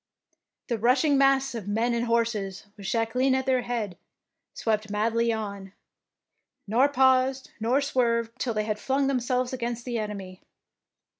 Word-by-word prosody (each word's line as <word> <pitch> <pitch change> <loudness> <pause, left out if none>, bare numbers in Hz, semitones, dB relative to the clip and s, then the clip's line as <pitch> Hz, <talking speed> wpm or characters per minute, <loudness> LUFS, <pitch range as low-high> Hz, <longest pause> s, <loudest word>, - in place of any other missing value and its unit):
The 235 -3 -1
rushing 255 +6 +3
mass 270 -1 +3
of 220 -5 -6
men 225 +4 +1
and 235 0 -1
horses, 220 -5 -1
with 200 -2 -8
Jacqueline 245 +4 +1
at 265 0 -1
their 260 -1 +2
head, 225 -7 -4 0.6
swept 215 -1 -1
madly 230 +3 +1
on, 200 -3 -5 0.9
nor 245 +7 +3
paused 260 -1 +2
nor 240 +6 +2
swerved 235 -5 +1
till 235 -4 -1
they 215 - +1
had 215 -1 -2
flung 270 +3 0
themselves 255 -1 0
against 240 -2 -3
the 240 -2 -2
enemy. 195 -3 -6
235 Hz, 145 wpm, -26 LUFS, 215-260 Hz, 0.9 s, rushing